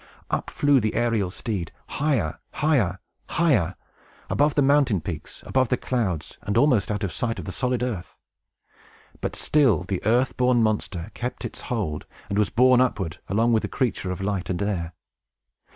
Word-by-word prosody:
Up - - -1
flew 145 -2 +3
the 110 -2 -1
aerial 115 -5 +1
steed, 95 -4 -4
higher, 125 - -1
higher, 130 - +2 0.3
higher, 125 - +2 0.6
above 145 0 +2
the 145 - +4
mountain 140 -7 +4
peaks, 85 0 -7
above 130 -1 +2
the 125 - +2
clouds, 95 - -2
and 100 +2 -1
almost 125 -6 +4
out 105 0 -2
of 95 -5 -2
sight 115 -1 -2
of - - -6
the 95 - -4
solid 125 +2 -1
earth. 105 -8 -4 1.0
But - - -3
still 130 - +3
the 95 0 -3
earth 120 +5 +2
born 125 -2 +3
monster 105 -3 -1
kept 125 +1 -4
its - - -7
hold, 95 -11 -2 0.2
and 100 +1 0
was 105 - +2
borne 125 +1 +5
upward, 95 -11 -1
along 115 +4 +2
with 110 - +3
the - - -3
creature 120 -7 -1
of 90 +1 -4
light 95 -2 -2
and 90 - -1
air. 90 -5 -2
110 Hz, 170 wpm, -25 LUFS, 95-125 Hz, 1.0 s, borne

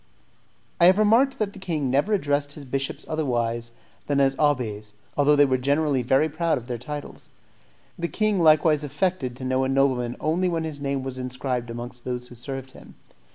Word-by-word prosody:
I 175 - +7
have 185 +2 +6
remarked 230 +6 +4
that 205 -2 -2
the 195 - -11
king 165 -7 -2
never 145 +10 +1
addressed 145 -6 0
his 145 -1 -10
bishops 135 +1 -3
otherwise 120 -6 -1 0.4
than 145 -1 +1
as 135 -1 +3
abbés, 110 -8 0 0.2
although 145 +1 +4
they 145 0 +6
were 130 -2 +1
generally 140 0 +1
very 135 +5 +3
proud 160 +1 0
of 120 - -7
their 120 -2 -4
titles. 145 +4 -8 0.7
The 170 - -1
king 215 -1 0
likewise 155 -1 +4
affected 145 -3 -1
to 130 - -7
know 130 +1 +1
a 130 - 0
nobleman 130 -3 +1
only 175 +4 +1
when 165 -2 -1
his 155 -3 -5
name 140 -1 -2
was 130 -1 -5
inscribed 125 -1 -3
amongst 120 +1 -7
those 125 -1 -4
who - - -11
served 135 +2 -7
him. - - -15
140 Hz, 190 wpm, -24 LUFS, 125-155 Hz, 0.7 s, I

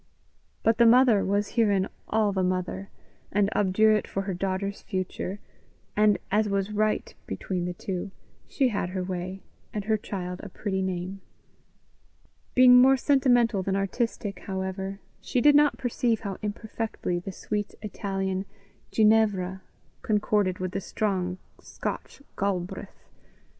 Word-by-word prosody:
But 225 0 +3
the 235 - +7
mother 240 -3 +6
was 205 +1 0
herein 205 -5 +2 0.2
all 215 -2 +2
the 190 -1 0
mother, 185 +1 -2 0.4
and 205 0 +2
obdurate 210 +2 +3
for 195 - -3
her 195 -1 -3
daughter's 195 +2 -2
future; 185 0 -4 0.6
and, 210 -1 +4
as 210 +1 +2
was 200 +1 0
right 215 - 0
between 180 -2 -3
the 180 0 -4
two, 185 +1 -4 0.4
she 265 -3 +1
had 200 -5 -2
her 185 0 -3
way, 185 +1 -5 0.3
and 210 - -3
her 220 0 +2
child 180 -3 -5
a 205 - -8
pretty 190 0 -2
name. 185 +1 -3 1.3
Being 250 -1 +8
more 265 +1 +6
sentimental 245 -6 +3
than 190 +1 -1
artistic, 195 0 -2
however, 190 0 -4 0.2
she 250 - 0
did 295 +4 +6
not 295 0 +5
perceive 235 -2 0
how 200 -4 -4
imperfectly 215 -3 -3
the 185 +2 -6
sweet 205 +2 -4
Italian 195 -2 -2 0.4
Ginevra 210 -4 +3 0.4
concorded 205 -3 +1
with 185 -1 -3
the 195 - -3
strong 185 -3 -1 0.2
Scotch 280 - -6
Galbraith. 185 -3 -3
200 Hz, 135 wpm, -27 LUFS, 190-220 Hz, 1.3 s, Being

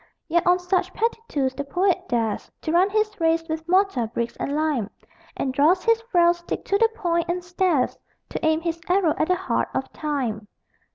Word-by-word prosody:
Yet 345 +1 +1
on 360 0 +5
such 360 +1 -1
petty 455 0 0
tools 265 -3 -1
the 285 - -4
poet 360 +6 0
dares 225 -3 -1
To 315 - -1
run 360 +4 +4
his 425 0 0
race 325 0 +1
with 320 +1 -5
mortar, 370 - +2
bricks 235 +1 -3
and 280 - -2
lime, 300 -9 0 0.5
And 265 - -1
draws 320 +7 +3
his 460 0 +3
frail 345 -1 +5
stick 345 0 -6
to 400 - +2
the 455 0 +5
point, 340 -5 0
and 355 +1 -1
stares 355 -6 0 0.3
To - - -5
aim 315 0 +2
his 335 -1 -3
arrow 360 -4 +3
at 310 - +2
the 365 - +3
heart 375 - -1
of 265 - -3
Time. 250 -9 -3
335 Hz, 195 wpm, -24 LUFS, 285-365 Hz, 0.5 s, on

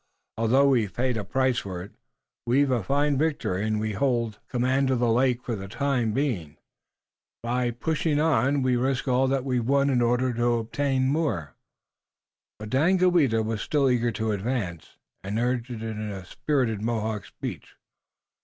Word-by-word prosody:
Although 130 +5 +3
we've 110 -8 +1
paid 125 0 0
a 110 - -2
price 130 +4 +1
for 90 -3 -6
it, 100 - -12 0.6
we've 135 +3 +3
a 120 -3 +1
fine 140 +5 +1
victory 125 - 0
and 110 0 0
we 110 0 -2
hold 115 -2 0
command 130 +2 +1
of 130 - +2
the 120 -1 +2
lake 125 +1 +2
for 120 - -3
the 95 -1 -7
time 125 0 0
being. 105 - -2 0.9
By 120 +1 0
pushing 150 +4 -1
on 145 -3 +2
we 125 -1 +2
risk 130 +2 -1
all 130 +1 +3
we've 130 -2 0
won 140 +3 +2
in 125 -2 +2
order 125 +1 +1
to 120 +1 +1
obtain 130 +3 0
more." 135 - -1 1.0
But 105 0 -8
Daganoweda 160 -5 +3
was 110 -1 -3
still 140 -3 +2
eager 120 -1 +1
to 110 +1 -1
advance, 100 - -3 0.3
and 100 +3 -3
urged 120 +1 -1
it 115 -2 -6
in 110 -1 -4
a 95 -2 -7
spirited 125 -2 -1
Mohawk 110 -2 -2
speech. - - -8
125 Hz, 165 wpm, -26 LUFS, 110-135 Hz, 1.0 s, Although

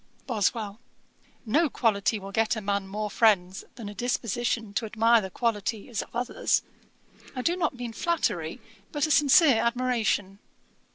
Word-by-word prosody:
BOSWELL. 215 -2 -1 0.7
'No 295 +8 +2
quality 220 -3 +1
will 195 -1 -8
get 225 +3 +1
a - - -3
man 200 -1 -1
more 210 +1 -4
friends 190 -5 +2
than 230 -5 -8
a 205 - -6
disposition 240 -2 -2
to 225 - -1
admire 225 +2 +4
the 190 - -5
qualities 220 0 -2
of - - -10
others. 245 +1 0 0.7
I 255 - -3
do 340 +5 +2
not 325 -7 -1
mean 245 -2 -6
flattery, 340 +7 -1 0.3
but 295 -1 0
a 310 - -2
sincere 290 -2 +6
admiration.' 235 -5 0
225 Hz, 150 wpm, -27 LUFS, 205-250 Hz, 0.7 s, sincere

